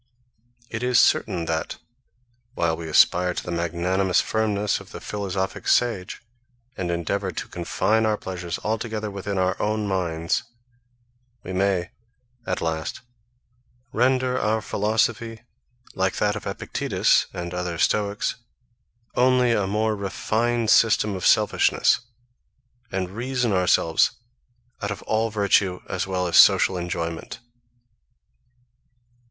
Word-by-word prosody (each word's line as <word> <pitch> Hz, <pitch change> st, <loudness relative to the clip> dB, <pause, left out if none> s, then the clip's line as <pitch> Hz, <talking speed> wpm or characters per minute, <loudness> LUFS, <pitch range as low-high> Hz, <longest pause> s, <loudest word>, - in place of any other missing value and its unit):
It 110 Hz, -, -4 dB
is 125 Hz, -1 st, +3 dB
certain 85 Hz, -2 st, +2 dB
that, 80 Hz, -1 st, -3 dB, 0.8 s
while 80 Hz, -1 st, +1 dB
we 80 Hz, -1 st, -7 dB
aspire 90 Hz, +3 st, +4 dB
to -, -, -3 dB
the 90 Hz, -, -6 dB
magnanimous 85 Hz, +2 st, 0 dB
firmness 105 Hz, -2 st, 0 dB
of -, -, -13 dB
the -, -, -8 dB
philosophic 95 Hz, -2 st, -4 dB
sage, 115 Hz, -7 st, +1 dB, 0.5 s
and 90 Hz, -5 st, -3 dB
endeavour 95 Hz, +3 st, -2 dB
to -, -, -5 dB
confine 100 Hz, +5 st, 0 dB
our 105 Hz, -1 st, +1 dB
pleasures 90 Hz, -3 st, -5 dB
altogether 110 Hz, -1 st, -2 dB
within 100 Hz, 0 st, -4 dB
our 95 Hz, 0 st, +1 dB
own 105 Hz, 0 st, -1 dB
minds, 85 Hz, -4 st, -1 dB, 1.0 s
we 95 Hz, -, -6 dB
may, 95 Hz, -2 st, 0 dB, 0.6 s
at 90 Hz, -, -2 dB
last, 80 Hz, +4 st, -3 dB, 0.9 s
render 130 Hz, +2 st, +2 dB
our 110 Hz, +1 st, +1 dB
philosophy 110 Hz, +2 st, -1 dB, 0.5 s
like 95 Hz, 0 st, 0 dB
that 105 Hz, 0 st, +1 dB
of 105 Hz, -, -6 dB
Epictetus, -, -, +1 dB
and 85 Hz, 0 st, -6 dB
other 90 Hz, -1 st, -3 dB
Stoics, 105 Hz, +4 st, 0 dB, 0.8 s
only 125 Hz, -1 st, +3 dB
a 105 Hz, -4 st, +1 dB
more 110 Hz, +2 st, 0 dB
refined 110 Hz, +3 st, 0 dB
system 105 Hz, -2 st, +4 dB
of 95 Hz, -, 0 dB
selfishness, -, -, +3 dB, 0.9 s
and 95 Hz, -1 st, -2 dB
reason 120 Hz, +1 st, -1 dB
ourselves 90 Hz, -3 st, +3 dB, 0.7 s
out 100 Hz, -, -2 dB
of 105 Hz, -3 st, -5 dB
all 110 Hz, +1 st, 0 dB
virtue 100 Hz, -3 st, +2 dB
as 95 Hz, 0 st, -3 dB
well 90 Hz, -1 st, -1 dB
as 85 Hz, -, +2 dB
social 95 Hz, -, +6 dB
enjoyment. 85 Hz, -2 st, -4 dB
100 Hz, 120 wpm, -24 LUFS, 90-110 Hz, 1.0 s, social